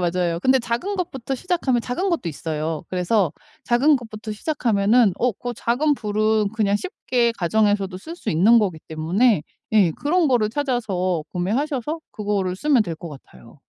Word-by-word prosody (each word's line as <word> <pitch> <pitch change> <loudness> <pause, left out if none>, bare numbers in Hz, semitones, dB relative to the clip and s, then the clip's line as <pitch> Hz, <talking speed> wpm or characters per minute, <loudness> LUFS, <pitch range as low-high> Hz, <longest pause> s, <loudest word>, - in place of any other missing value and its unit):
맞아요. 175 -1 0
근데 260 +6 +4
작은 245 - -2
것부터 270 -8 -3
시작하면 265 -6 0
작은 345 +11 -2
것도 330 - -1
있어요. 155 +1 -3
그래서 185 0 +1 0.3
작은 270 +5 +4
것부터 220 -2 -7
시작하면은 220 - +2
어 250 0 +2
그 245 +5 -6
작은 250 +7 +1
불은 215 -2 +1
그냥 205 -2 +2
쉽게 240 - -1
가정에서도 200 +1 +1
쓸 325 - -9
수 225 - -4
있는 205 +9 +5
거기 190 -7 0
때문에 170 +6 +2 0.3
예 205 -6 +5
그런 330 - +1
거를 240 -5 +2
찾아서 220 - -1
구매하셔서 260 - -1
그거를 200 -3 -2
쓰면 275 +1 +3
될 170 -5 -4
것 170 +2 -9
같아요. 100 - -15
220 Hz, 355 characters per minute, -22 LUFS, 185-255 Hz, 0.3 s, 있는